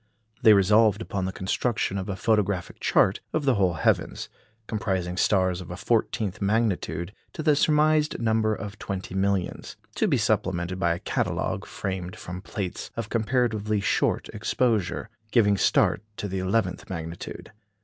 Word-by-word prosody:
They 110 -4 +8
resolved 105 +1 +4
upon 100 -4 -3
the 95 - -2
construction 100 +1 -1
of 95 - -5
a 100 - -2
Photographic 100 -4 0
Chart 95 - +3
of 155 -2 0
the 135 - +4
whole 95 -5 +2
heavens, 80 - 0 0.4
comprising 95 -5 -2
stars 95 -1 +2
of 90 - -10
a 90 - -6
fourteenth 105 -1 0
magnitude, 100 -3 0 0.2
to 155 - -5
the 150 -2 +4
surmised 150 +1 +3
number 110 -1 +2
of 105 -1 -7
twenty 95 -1 -5
millions; 95 -1 -1 0.2
to - - +2
be - - +2
supplemented 90 0 0
by 85 -1 +2
a - - -7
Catalogue, - - -2
framed 95 -2 -4
from 90 +1 -7
plates 95 -2 -5
of 115 -2 -3
comparatively 110 -2 +1
short 100 - +1
exposure, 110 -1 0 0.2
giving 105 -3 +4
start - - +3 0.2
to 105 - -3
the 95 -1 -3
eleventh 95 0 -1
magnitude. 85 -2 -6
100 Hz, 150 wpm, -26 LUFS, 95-110 Hz, 0.4 s, They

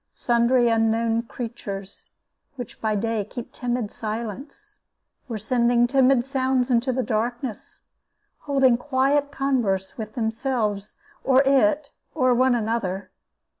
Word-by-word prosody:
Sundry 240 +1 +2
unknown 225 0 +2
creatures, 220 -5 -7 0.5
which 245 -3 -8
by 215 -1 0
day 220 0 -1
keep 235 +4 -9
timid 240 -3 -2
silence, 225 +5 -7 0.5
were 230 -3 -4
sending 235 +2 +2
timid 260 -1 +3
sounds 260 -2 0
into 245 +2 +2
the 255 0 -1
darkness, 240 +1 -3 0.6
holding 270 -4 +3
quiet 280 +2 +1
converse 235 -9 -1
with 215 +1 -6
themselves, 225 -3 -2 0.3
or 265 0 +4
it, 285 +2 +2 0.2
or 255 -4 +3
one 255 +1 +3
another. 205 -5 -2
240 Hz, 115 wpm, -24 LUFS, 220-260 Hz, 0.6 s, or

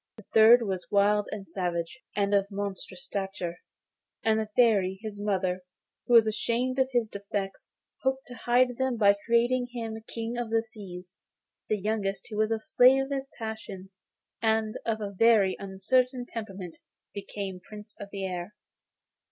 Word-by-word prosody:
The 220 - -13
third 230 +2 +8
was 190 -4 -3
wild 205 +1 +3
and 200 -2 -6
savage, 175 +4 -3 0.2
and 200 0 +1
of 200 -1 +3
monstrous 200 +6 -5
stature; 190 -5 -4 0.6
and 220 0 +3
the 215 -1 -3
Fairy, 200 -6 +4
his 205 -2 -6
mother, 185 -3 0 0.5
who 245 - +5
was 230 -1 +8
ashamed 240 +4 0
of 260 0 +3
his 240 -3 +2
defects, 200 -1 -5 0.3
hoped 265 0 0
to 245 - -10
hide 245 +1 +2
them 260 -2 0
by 200 -2 +6
creating 240 +2 +3
him 225 -2 -5
King 230 +1 -4
of 240 -2 -3
the 225 0 +2
Seas. 190 -4 -10 0.5
The 215 - +2
youngest, 200 -1 -2
who 210 - -4
was 215 0 +2
the 225 -1 0
slave 265 0 +5
of 270 - -8
his 275 0 -3
passions 210 -4 -7 0.5
and 220 -1 +1
of 220 -1 0
a 205 -1 -3
very 205 -2 +4
uncertain 245 +6 0
temper, 220 -4 -6 0.6
became 200 -2 -5
Prince 210 +2 -12
of 200 - -7
the 195 -1 -4
Air. 180 +2 -5
215 Hz, 160 wpm, -28 LUFS, 195-235 Hz, 0.6 s, third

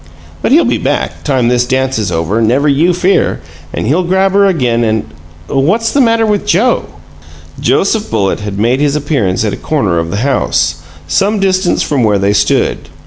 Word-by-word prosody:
But - - -1
he'll 320 +5 +5
be - - 0
back, - - -2
time 130 -5 0
this 125 0 +1
dance 130 -1 0
is 105 -4 -2
over, 85 +7 -1
never 125 +7 +2
you 150 +5 +3
fear, 180 +2 +1 0.3
and - - -4
he'll 160 +7 +1
grab 190 +2 +1
her 200 +1 +3
again 125 -10 0
and 110 -5 0 0.4
What's 195 - 0
the 280 - +2
matter 230 -2 +2
with 210 -2 0
Joe?" 210 +4 +1 0.7
Joseph 200 - 0
Bullitt 95 -1 0
had 105 -1 -5
made 120 +5 +1
his 145 0 +1
appearance 115 - -1
at 105 - -1
a - - -4
corner 105 - -1
of 85 0 -3
the 100 - -3
house, 80 - 0 0.3
some 200 - +1
distance 185 -2 +1
from 140 -5 0
where 105 -2 +2
they 100 +1 +1
stood. - - 0
135 Hz, 190 wpm, -12 LUFS, -, 0.7 s, he'll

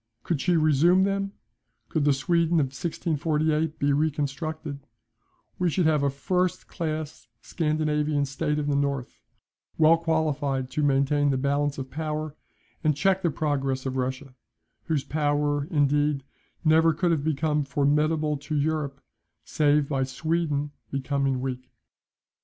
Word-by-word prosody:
Could 160 -6 -1
she 175 -2 +2
resume 160 +4 +4
them, 195 0 -1 0.5
could 155 -4 0
the 145 - +5
Sweden 165 +4 +2
of 135 -3 -1
1648 155 0 -1
be 140 0 +1
reconstructed, 145 0 -2 0.8
we 180 -1 +2
should 175 +2 +1
have 155 -2 +3
a 140 - +2
first 180 +6 -1
class 155 -5 -4 0.2
Scandinavian 150 -2 0
State 150 +2 -2
in 150 -1 -1
the 145 - +1
North, 140 -2 -2 0.6
well 160 +1 +6
qualified 150 -5 -1
to 150 - -1
maintain 145 +1 +2
the 135 - +1
balance 140 +2 0
of 130 -1 -6
power, 155 0 -3 0.5
and 150 -3 +2
check 190 +4 +2
the 175 - +2
progress 135 -4 -1
of 130 -1 -2
Russia; 130 +1 -3 0.5
whose 155 -4 0
power, 145 -1 0
indeed, 145 -1 +1 0.4
never 160 +1 +5
could 175 +2 +1
have 155 -4 0
become 150 0 0
formidable 150 +2 +1
to 150 +2 -5
Europe, 145 -2 -1 0.4
save 150 -1 +2
by 140 -2 -1
Sweden 150 +1 -1 0.2
becoming 135 -1 -1
weak. 130 -1 -5
150 Hz, 135 wpm, -26 LUFS, 140-160 Hz, 0.8 s, well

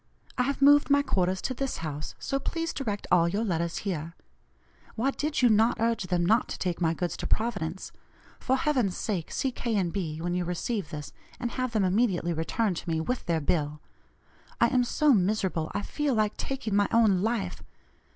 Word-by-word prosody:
I - - +1
have 275 +2 0
moved 290 +1 +6
my 285 0 +4
quarters 185 -6 0
to 260 - -1
this 270 +1 -3
house, 150 0 -5
so 275 - -2
please 330 +3 -3
direct 210 -7 -3
all 170 -1 +5
your 205 +5 -1
letters 170 -5 -1
here. 170 -4 -3 0.8
Why 260 +5 +1
did 295 -1 -2
you 245 - +7
not 220 +2 +3
urge 230 -3 0
them 175 -1 +1
not 220 +6 +3
to - - -4
take 180 -1 -2
my 165 -1 +2
goods 175 -1 -2
to - - -3
Providence? 195 -6 -2 0.5
For 260 - +1
heaven's 255 -8 +1
sake 185 -7 -3
see 265 - -1
K. 235 -3 -1
& - - -3
B. 160 -5 -3
when 175 +1 -2
you 180 0 0
receive 180 +1 -3
this, 150 -2 -7 0.3
and 240 -1 -2
have 255 -2 -2
them 215 -3 +2
immediately 185 -3 +1
returned 180 +4 -1
to - - -5
me, 160 -1 0
with 245 +9 -3
their 165 -2 +2
bill. 150 -1 0 0.8
I - - +5
am 255 -2 +3
so 295 +4 +3
miserable 190 -5 0
I 205 - -1
feel 295 -4 -1
like 215 -1 +1
taking 265 -7 -3
my 205 0 +3
own 215 -5 +4
life. 225 0 -1
205 Hz, 200 wpm, -28 LUFS, 175-245 Hz, 0.8 s, you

